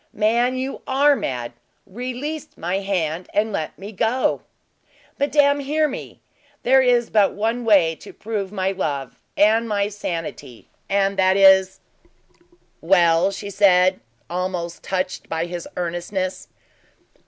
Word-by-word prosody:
"Man, 235 +4 +1
you 265 +1 -4
are 280 +2 +4
mad! 125 - -4 0.3
Release 255 +8 -5
my 180 +4 -2
hand 180 -4 -2
and 215 +1 +1
let 160 -6 -4
me 200 +2 -8
go!" 225 +5 0 0.8
"Madame, 285 0 +3
hear 300 +2 +1
me. 270 - -8 0.4
There 265 +2 +5
is 245 -2 +2
but 210 -2 +3
one 225 +4 -1
way 190 -7 +4
to - - -12
prove 205 -3 -5
my 190 -2 -1
love, 145 -8 -4 0.2
and 225 +3 +3
my 205 -1 0
sanity, 165 - -6 0.2
and 195 0 +1
that 190 0 +4
is 190 -1 +5 0.5
" 345 - -34 0.3
"Well?" 170 0 +4
she 200 +1 -7
said, 185 -2 +4 0.3
almost 175 0 -4
touched 185 -1 -3
by 165 +1 -1
his 175 -1 -6
earnestness. 180 +2 -3
195 Hz, 130 wpm, -21 LUFS, 180-235 Hz, 0.8 s, There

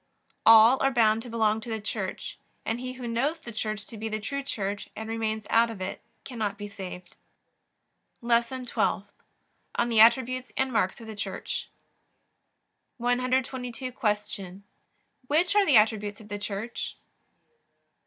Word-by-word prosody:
All 225 +3 +8
are 270 - +4
bound 225 -4 +3
to 245 - -9
belong 220 -1 +1
to 235 - -8
the 220 -1 -2
Church, 210 - -4 0.3
and 225 +2 -1
he 255 0 -5
who 250 -1 -7
knows 265 +8 0
the 240 -7 -10
Church 215 -1 -3
to 225 - -8
be 220 +1 -3
the 215 0 -2
true 280 +7 -3
Church 205 -6 -3
and 220 +1 -6
remains 220 -1 -2
out 230 +1 +5
of 225 -4 -7
it 185 0 -4 0.2
cannot 215 -5 -3
be 205 0 -6
saved. 185 -3 -9 1.0
LESSON 235 +2 +1
TWELFTH - - 0 0.6
ON 240 - +1
THE 225 -2 +3
ATTRIBUTES 255 +3 +4
AND 265 -1 0
MARKS 190 -2 +1
OF - - -9
THE 220 -1 -7
CHURCH 205 - -4 1.3
122. 255 +1 -1
Q. 210 -4 -2 0.6
Which 335 +7 +2
are 410 -1 +5
the 280 -6 +7
attributes 210 -1 +2
of 215 -1 -14
the 205 0 -4
Church? 210 +3 -4
225 Hz, 155 wpm, -27 LUFS, 210-250 Hz, 1.3 s, All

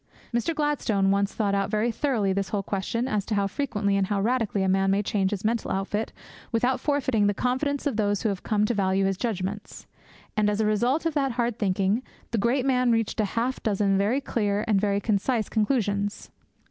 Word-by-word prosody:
Mr. 240 +8 0
Gladstone 225 -10 +1
once 200 0 +1
thought 205 -3 -1
out 200 0 0
very 215 +3 +1
thoroughly 230 -6 0
this 195 0 -2
whole 200 -2 -1
question 210 +6 -2
as 210 -5 0
to 220 - -1
how 200 -1 +2
frequently 205 -2 -1
and 195 -1 +1
how 205 0 0
radically 220 -2 0
a - - +1
man 195 +1 +2
may 200 +2 +2
change 195 -2 0
his 205 0 -4
mental 230 0 0
outfit 205 +3 -2 0.4
without 245 +3 +1
forfeiting 265 -8 +1
the 205 - +1
confidence 270 +5 -1
of 275 -7 0
those 205 -2 0
who 220 - +2
have 195 -2 -3
come 210 -1 +1
to 240 - 0
value 195 -2 +1
his 195 0 +1
judgements. 205 -1 -4 0.5
And, 210 -1 +2
as 210 0 -1
a 220 - +2
result 240 +9 +1
of 330 - +1
that 275 -4 0
hard 235 -1 -1
thinking, 195 +2 +1 0.3
the 230 - 0
great 250 +5 +1
man 250 -2 +3
reached 225 -1 0
half 230 +5 0
a - - -14
dozen 200 -2 +1
very 210 +8 +1
clear 210 -5 -1
and 205 -3 +3
very 200 -1 +1
concise 215 +2 0
conclusions. 205 -3 -1
210 Hz, 210 wpm, -26 LUFS, 200-240 Hz, 0.5 s, man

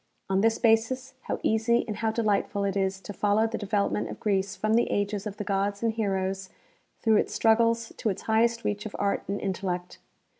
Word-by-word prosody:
On 190 0 +3
this 225 +1 +3
basis, 245 +4 +2
how - - -2
easy 225 +2 +2
and 210 -2 -4
how 225 +1 0
delightful 210 -2 0
it 200 -1 -1
is 190 -1 0
to 205 - -7
follow 210 +2 +2
the 225 - -3
development 205 0 0
of - - -7
Greece 195 -1 0
from 215 +1 0
the 235 +1 +3
ages 205 0 -1
of 205 -1 -7
the - - -3
gods 200 +1 -1
and 225 -1 +2
heroes 195 -3 -2 0.5
through 220 -2 +5
its - - 0
struggles 230 0 +3
to 220 - 0
its 190 - -4
highest 230 +1 +2
reach 210 +1 -2
of 210 - -10
art 200 0 0
and 200 +1 -2
intellect 180 -2 -3
210 Hz, 200 wpm, -27 LUFS, 195-225 Hz, 0.5 s, through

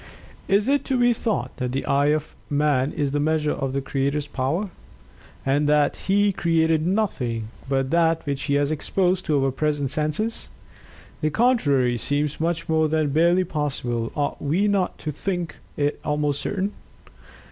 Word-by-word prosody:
Is 200 +3 +2
it 285 +1 +2
to 265 - 0
be 245 0 +4
thought 225 -2 -2
that 125 -2 -3
the 135 - -2
eye 140 +1 +2
of 150 0 0
man 145 -2 +2
is 145 -2 -1
the 145 - 0
measure 150 0 +1
of 135 -2 -2
the 135 +1 -1
Creator's 140 +2 -1
power? 150 +8 -2 0.7
and 145 +2 +2
that 150 -1 +3
He 200 +1 +2
created 160 -2 +2
nothing 125 - -1 0.2
but 135 -1 0
that 165 -1 +2
which 140 -1 -2
he 140 - +1
has 145 +1 +1
exposed 180 +4 0
to 145 -4 +2
our 135 - +1
present 145 0 -1
senses? 155 +10 -2 0.7
The 155 - +2
contrary 145 - +2
seems 145 +4 0
much 170 0 -1
more 160 -1 +2
than 155 -1 +1
barely 170 +5 +3
possible; 135 -8 -2
ought 145 -1 -2
we 170 +9 +1
not 200 -3 0
to 155 - -4
think 175 +2 -3 0.2
it 145 0 0
almost 150 -1 0
certain?" 200 0 -2
150 Hz, 165 wpm, -23 LUFS, 140-175 Hz, 0.7 s, be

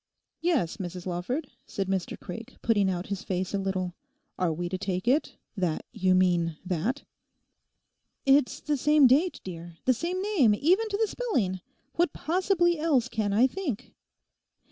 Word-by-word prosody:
'Yes, 315 - +1
Mrs 180 -2 -6
Lawford,' 190 - -3 0.2
said 195 -1 -3
Mr 190 -2 -2
Craik, 225 +7 -8
putting 205 -4 +3
out 180 0 -2
his 200 -1 -3
face 185 0 -2
a 200 - +1
little, 185 -2 -2 0.5
'are 180 -2 +2
we 175 +2 -3
to 185 +1 -3
take 185 +1 -3
it 280 +5 +2 0.2
that 180 -6 -1
you 185 0 +2
mean 175 -3 +2
that?' 190 - -1 1.2
'It's 275 -1 +3
the 295 -2 0
same 300 +1 +5
date, 295 +8 +4
dear, 170 -2 -8
the 255 - +5
same 345 +9 -2
name 305 - +4
even 370 - +2
to 405 - -1
the 445 - +3
spelling; 235 - -1 0.4
what 345 -3 +2
possibly 345 0 +1
else 275 -7 +2
can 215 -4 -1
I 220 +5 +5
think? 270 - -3
220 Hz, 160 wpm, -28 LUFS, 185-305 Hz, 1.2 s, same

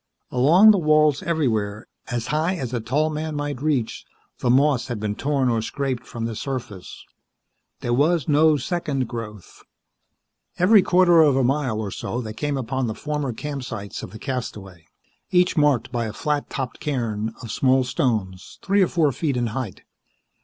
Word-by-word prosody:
Along 165 +12 +6
the 200 - +3
walls, 155 -3 +3
everywhere, 115 - -1 0.2
as 120 -2 -3
high 160 +5 +1
as 130 -7 -5
a 120 - 0
tall 145 +8 0
man 155 0 -4
might 145 -3 -3
reach, 140 -7 -1 0.4
the 125 - 0
moss 130 -1 +3
had 120 -4 -4
been 105 -1 -2
torn 135 +3 0
or 115 -2 +1
scraped 130 0 -3
from 115 -1 -5
the 115 -1 -4
surface. 120 -6 -6 0.8
There 120 - -1
was 155 +3 +2
no 155 +1 +4
second 145 -3 -2
growth. 110 -5 -8 1.0
Every 200 +4 +6
quarter 175 -2 +5
of 145 -4 +4
a 135 - +2
mile 130 -4 0
or 105 -3 -4
so 120 - -4
they 110 -3 -5
came 145 +5 -2
upon 130 0 -2
the 110 - -3
former 150 0 -3
campsites 125 -6 -6
of - - -7
the 110 - -10
castaway, 105 - -6 0.4
each 180 0 +3
marked 145 -7 +2
by 120 -2 -1
a 110 - -5
flat 150 +3 -2
topped 130 -2 -5
cairn 115 -6 -2
of 115 - -6
small 130 0 +3
stones 110 - -2
three 200 +1 +2
or 185 - +4
four 160 -5 +2
feet 140 -1 -2
in 120 - 0
height. 120 -8 -5
130 Hz, 175 wpm, -23 LUFS, 115-150 Hz, 1.0 s, Along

